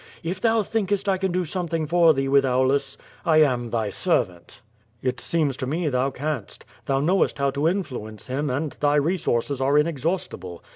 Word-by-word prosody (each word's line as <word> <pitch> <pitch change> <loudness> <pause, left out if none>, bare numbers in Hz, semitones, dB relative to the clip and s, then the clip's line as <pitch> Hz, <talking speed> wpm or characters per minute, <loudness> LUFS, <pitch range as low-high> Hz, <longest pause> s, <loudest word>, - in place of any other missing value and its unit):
If 180 +3 -4
thou 225 -1 +3
thinkest 205 -1 -1
I 190 -1 +2
can 190 -1 0
do 180 0 0
something 165 -1 -2
for 170 +1 +5
thee 135 -2 0
with 140 0 +4
Aulus 135 +1 +1
— - - -26
I 155 0 +7
am 125 -4 0
tliy 110 -3 -2
servant." 90 +6 -1 0.4
"It 130 -1 -1
seems 155 -5 0
to 130 - -3
me, 160 +3 -1
thou 130 0 +1
canst. 140 -5 -5 0.2
Thou 135 0 +2
knowest 180 +3 +2
how 140 -1 +1
to 140 +3 0
in 190 +3 +1
fluence 110 - -8
him, 140 +3 -2
and 140 +4 -2
thy 145 0 +2
resources 145 -4 0
are 140 +2 +3
inexhaustible. 150 - -2
145 Hz, 190 wpm, -24 LUFS, 130-170 Hz, 0.4 s, I